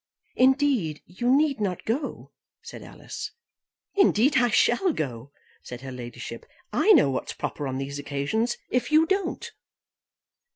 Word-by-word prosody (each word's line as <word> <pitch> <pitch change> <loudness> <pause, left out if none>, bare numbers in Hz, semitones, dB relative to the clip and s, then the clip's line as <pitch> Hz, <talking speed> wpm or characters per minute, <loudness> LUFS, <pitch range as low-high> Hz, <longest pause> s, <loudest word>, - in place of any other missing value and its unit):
"Indeed 260 - +2
you 215 +7 -3
need 280 0 +3
not 185 -4 -2
go," 270 +6 -3 0.3
said - - -9
Alice. - - -8 0.6
"Indeed 290 - +4
I 245 -2 +4
shall 305 - +3
go," 130 - -5 0.3
said 125 0 -9
her 135 0 -7
ladyship. 120 -1 -8 0.3
"I 435 - +4
know 245 - +5
what's 130 - -3
proper 145 - -4
on 130 0 -3
these 140 +1 -4
occasions, 145 - -1
if 250 +4 0
you 310 +1 +6
don't." 385 0 -2
225 Hz, 135 wpm, -26 LUFS, -, 0.6 s, you